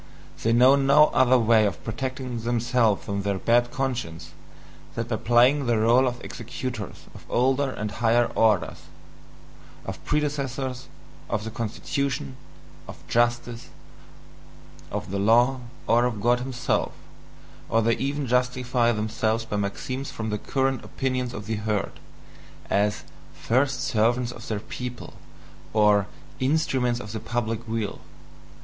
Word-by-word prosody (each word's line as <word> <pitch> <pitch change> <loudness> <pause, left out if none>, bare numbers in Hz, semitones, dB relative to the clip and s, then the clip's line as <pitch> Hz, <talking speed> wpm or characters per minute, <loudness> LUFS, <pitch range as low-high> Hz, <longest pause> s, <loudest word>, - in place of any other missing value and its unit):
They 115 - +1
know 125 +4 +6
no 140 +2 +5
other 130 -1 +5
way 110 -2 +4
of 80 -6 -5
protecting 130 +1 -4
themselves 120 -2 +1
from 100 0 -2
their 100 0 -1
bad 120 +4 +3
conscience 120 - -4 0.6
than 115 - -2
by 115 -1 -2
playing 125 +5 +4
the 120 -1 +2
role 120 +4 +4
of 120 -1 -4
executors 120 -2 -6
of - - -13
older 135 +3 +2
and 105 -4 -4
higher 120 +2 +3
orders 110 -5 +2 1.1
(of - - -7
predecessors, 135 -3 -2 0.4
of 105 -1 -1
the 110 - -5
constitution, 115 - -3 0.5
of - - -9
justice, 120 0 0 1.2
of - - -5
the 100 - -1
law, 120 +6 +4 0.3
or 120 +1 +4
of 115 -4 -2
God 120 +4 +3
himself), 125 -1 -1 0.8
or 115 0 +2
they 115 +1 +3
even 140 +1 -2
justify 125 -1 +1
themselves 110 +1 -1
by 105 - -4
maxims 130 +7 -3
from 110 -1 -4
the 105 - -2
current 135 +1 -1
opinions 130 -2 -2
of 105 -4 -7
the 110 -1 -2
herd, 105 -2 -2 0.7
as 105 +1 +1 0.3
"first 135 +3 +1
servants 120 +2 +1
of - - -10
their 105 -2 -2
people," 125 +1 -7 0.6
or 105 -2 +4 0.3
"instruments 130 -4 +1
of 110 -4 -8
the 110 - -4
public 115 0 -3
weal". 110 -2 -3
120 Hz, 135 wpm, -25 LUFS, 110-130 Hz, 1.2 s, know